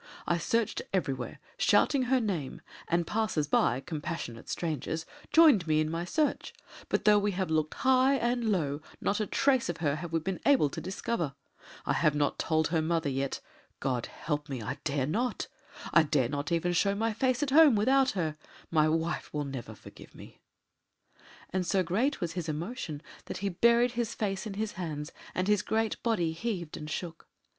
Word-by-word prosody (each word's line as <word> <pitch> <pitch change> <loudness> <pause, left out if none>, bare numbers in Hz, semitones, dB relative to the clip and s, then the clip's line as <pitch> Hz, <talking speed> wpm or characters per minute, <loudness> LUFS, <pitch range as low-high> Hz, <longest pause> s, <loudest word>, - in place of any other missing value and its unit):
I 170 - +1
searched 230 +6 0
everywhere, 135 -10 -2 0.2
shouting 275 -3 +3
her 260 +1 +3
name; 180 - -3 0.3
and 170 0 +1
passers 210 -7 0
by, 130 -3 +2
compassionate 150 -7 -5
strangers, 160 0 -3 0.3
joined 290 - +6
me 155 -1 +3
in 155 0 0
my 165 +1 -2
search; 300 - 0 0.4
but - - 0
though 210 -1 +6
we 205 0 0
have 185 -3 -2
looked 155 -1 0
high 260 +1 +4
and 240 -2 0
low 150 -6 0 0.2
not 205 - 0
a 215 - -1
trace 260 -7 +2
of 170 - -2
her 150 -3 0
have 170 +1 -6
we 165 - +2
been 185 +3 -3
able 265 - +4
to - - -5
discover. 180 -5 -3 0.5
I - - +1
have 155 -3 +2
not 145 -1 0
told 160 -1 +1
her 165 -1 +1
mother 160 -1 0
yet. 135 0 -2 0.4
God 125 -3 -1
help 150 -1 -4
me 135 -3 -3
I 125 +5 -5
dare 140 -3 0
not! 230 - -1 0.5
I 170 - +8
dare 145 -6 +1
not 145 +3 -3
even 170 +1 +1
show 200 +3 +2
my 225 +2 0
face 255 +4 +1
at 280 - -1
home 300 -3 +7
without 265 +5 +4
her 155 -3 -1 0.3
my 155 -1 +4
wife 165 +1 -1
will 150 -1 -2
never 125 -5 -6
forgive - - -14
me - - -13 0.5
"; - - -25
and 185 -1 +1
so 185 +1 +1
great 215 - 0
was 175 -4 -2
his 170 -3 -4
emotion 160 - -4 0.2
that - - -5
he - - +2
buried 235 +6 +4
his 235 -2 -2
face 195 -1 -2
in 200 - -6
his 215 +1 -2
hands, 155 -4 -5 0.2
and 185 +1 0
his 210 -2 +3
great 220 +1 -1
body 195 -9 +1
heaved 175 -2 -4
and 150 0 -7
shook. 165 0 -5
175 Hz, 190 wpm, -30 LUFS, 155-220 Hz, 0.5 s, I